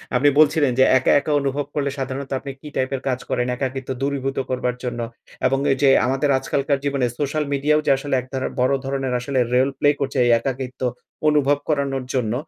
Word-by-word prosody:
আপনি 140 +4 +5
বলছিলেন 150 -2 +4
যে - - +8
একা, 130 - +2
একা 145 - -4
অনুভব 140 +1 -1
করলে 140 -1 0
সাধারণত 135 +1 -4
আপনি 140 - -7
কি 150 - -10
টাইপের 130 0 -1
কাজ 130 -1 0
করেন, 125 - 0
একাকিত্ব 130 0 -4
দূরীভূত 135 -1 -2
করবার 125 -1 -1
জন্য। 120 -1 -3 0.5
এবং 135 +1 +1
এই 135 - +1
যে 140 - +6 0.2
আমাদের 135 +3 0
আজকালকার 140 +1 -1
জীবনে 140 -2 +1
সোশ্যাল 150 +1 0
মিডিয়াও 150 +2 +2
যে - - +4
আসলে 140 0 -2
এক 125 - -2
ধারার 130 -1 -2
বড় 130 +2 +3
ধরনের 135 -1 -2
আসলে 130 +2 -1
রেল 130 +2 +3
প্লে 145 - +4
করছে 140 0 -2
এই 120 - +4
একাকিত্ব 130 0 -5 0.5
অনুভব 145 -1 +3
করানোর 140 -3 0
জন্য। 120 -4 0
135 Hz, 190 wpm, -22 LUFS, 130-140 Hz, 0.5 s, যে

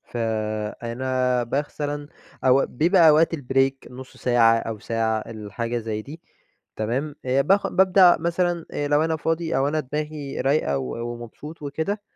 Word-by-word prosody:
فأنا 115 +3 -1
مثلًا 145 0 -3 0.4
أو 130 +1 +4
بيبقى 165 +4 +4
أوقات 160 +2 +4
البريك 135 -2 0
نص 130 +1 -11
ساعة 115 -2 +4
أو 115 -1 -5
ساعة 110 0 -1
الحاجة 115 +2 -5
زي 110 -2 -3
دي 150 +8 -11 0.5
تمام، 130 +7 -2
باخ 140 +10 +2
بابدأ 185 -1 +5
مثلًا 170 0 -1
آآ 145 - -2
لو 145 +2 +3
أنا 160 -1 0
فاضي 165 -1 -1
أو 135 +1 +2
أنا 155 +2 0
دماغي 150 0 -4
رايقة 135 - +1
و 115 - -4
ومبسوط 120 +7 -10
وكده 160 +9 -3
135 Hz, 140 wpm, -23 LUFS, 115-155 Hz, 0.5 s, بابدأ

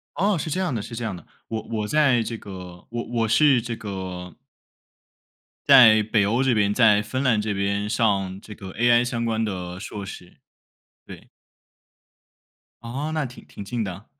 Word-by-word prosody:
哦， 200 +1 +1
是 160 - -4
这 185 - -1
样 175 -9 -1
的， 110 - -2
是 115 - -8
这 120 +1 -4
样 100 -5 -3
的。 85 - -13 0.2
我 110 -1 -3
我 105 -1 -2
在 140 -6 +3
这 115 +1 -4
个 90 -3 -10
我 120 0 -3
我 115 -1 +1
是 135 +1 +4
这 120 0 -4
个 95 -4 -6 1.3
在 110 -3 +8
北 105 -1 +1
欧 120 +5 +1
这 130 -2 +2
边， 100 -2 +2
在 110 -4 +5
芬 130 +5 -3
兰 115 -6 +2
这 110 0 -2
边 100 +1 -1
上 100 -4 0
这 105 - -11
个 95 -1 -9
AI 120 +2 +3
相 115 -1 -2
关 115 -1 0
的 90 -3 -5
硕 100 0 -7
士， 90 -2 -11 0.7
对。 - - -12 1.5
哦， 135 +7 -4
那 155 -2 -1
挺 125 - -12
挺 100 - -9
近 115 +2 -3
的。 95 +2 -7
110 Hz, 195 characters per minute, -24 LUFS, 100-120 Hz, 1.5 s, 在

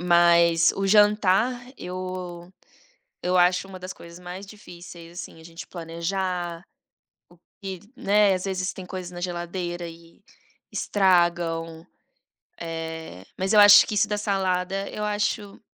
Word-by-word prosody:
Mas 170 -1 +5
o 195 0 -1
jantar, 210 +3 +4 0.2
eu 180 -1 -6 0.7
eu 180 +1 +2
acho 180 +2 +3
uma 185 -1 -10
das 185 +1 -7
coisas 170 +1 -13
mais 180 +2 -8
difíceis, 175 -4 -12
assim, - - -11
a - - -15
gente 165 +1 -10
planejar. 175 0 -3 1.0
O - - -
que, 190 -2 -5 0.2
né, 205 0 +3
às 185 - -4
vezes 190 -1 -2
tem 185 - -9
coisas 180 -1 -6
na 175 - -8
geladeira 175 0 -4
e 165 0 -14 0.5
estragam. 170 -3 +1 0.8
Eh, 160 - -6
mas 190 +2 0
eu 210 - +7
acho 205 0 +9
que - - -4
isso 210 +1 +2
da 210 - -1
salada, 195 -1 -1
eu 210 - -4
acho 210 -1 -2
180 Hz, 135 wpm, -25 LUFS, 170-195 Hz, 1.0 s, acho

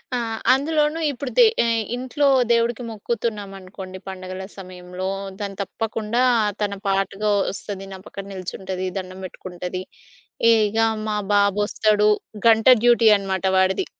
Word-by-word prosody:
ఆ! - - +1 0.4
అందులోనూ 300 +2 0
ఇప్పుడు 270 0 -6
దే - - +8 0.2
ఆహ్, 230 -1 +1
ఇంట్లో 260 +3 0 0.2
దేవుడికి 235 +1 +1
మొక్కుతున్నామనుకోండి 200 -4 -5
పండుగల 185 0 -6
సమయంలో, 180 0 -7 0.3
దాన్ని 200 -2 -5
తప్పకుండా 225 +3 -2 0.4
తన 205 -1 0
పాటగా 195 +2 0 0.2
ఒస్తది 195 0 -7
నా - - -7
పక్కన 195 - -8
నిల్చుంటది, 185 0 -5
దండం 185 0 -6
పెట్టుకుంటది. 180 0 -6 0.7
ఇగ 215 -1 +2 0.3
మా 210 -1 -1 0.2
బాబొస్తాడు, 205 +1 +2 0.4
గంట 225 0 +5 0.2
డ్యూటీ 240 -1 +5
అనమాట 195 -1 -3
వాడిది. 190 0 +2
200 Hz, 115 wpm, -22 LUFS, 190-230 Hz, 0.7 s, దే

